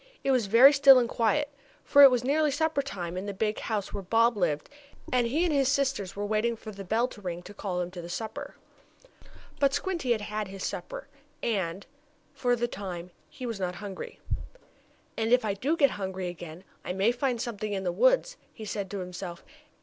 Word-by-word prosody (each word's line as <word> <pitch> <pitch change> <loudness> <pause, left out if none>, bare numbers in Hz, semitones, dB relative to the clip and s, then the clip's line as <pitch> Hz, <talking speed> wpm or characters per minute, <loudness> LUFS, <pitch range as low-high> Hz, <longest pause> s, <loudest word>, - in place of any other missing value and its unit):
It 275 - +2
was 250 -6 +2
very 245 +7 +8
still 275 -1 +8
and 245 -2 +3
quiet, 285 +6 0 0.3
for 285 - +6
it 275 - +12
was 250 -2 +1
nearly 300 +3 +2
supper 300 0 +1
time 180 -10 -5
in 190 +2 -4
the 200 - -4
big 215 +2 -1
house 210 -3 -3
where - - -3
Bob 230 +5 +3
lived, 160 -7 0 0.5
and 245 -2 +3
he 300 +8 +1
and 330 - +1
his 275 -2 +3
sisters 265 -9 0
were 205 +1 -3
waiting 215 +3 +1
for 220 -1 -9
the 200 -1 -8
bell 225 +6 +1
to 205 - -12
ring 175 -2 -5
to 200 - -11
call 195 -3 -4
them 180 0 -2
to 180 -1 -7
the 170 - -9
table. 220 +4 -5 1.0
But 275 -1 +3
Squinty 335 -10 0
had 220 - -3
had 210 0 -3
his 195 0 -7
supper, - - -5 0.4
and, 190 -4 -1 0.5
for 245 -1 +1
the 240 0 -1
time, 180 -5 -6 0.2
he 255 - -8
was 230 -4 -4
not 180 -1 -2
hungry. 195 0 -7 1.0
"And 225 0 0
if 250 -2 +4
I 205 - 0
do 275 +11 -1
get 280 -4 +5
hungry 190 -2 -4
again, 175 0 -9 0.2
I - - -3
may 195 +5 +3
find 245 -1 -1
something 215 -3 -4
in 195 -1 -2
the 180 - 0
woods," - - +3
he 220 - -9
said 200 -2 -4
to 200 - -4
himself. 180 -1 -7
215 Hz, 210 wpm, -28 LUFS, 190-260 Hz, 1.0 s, it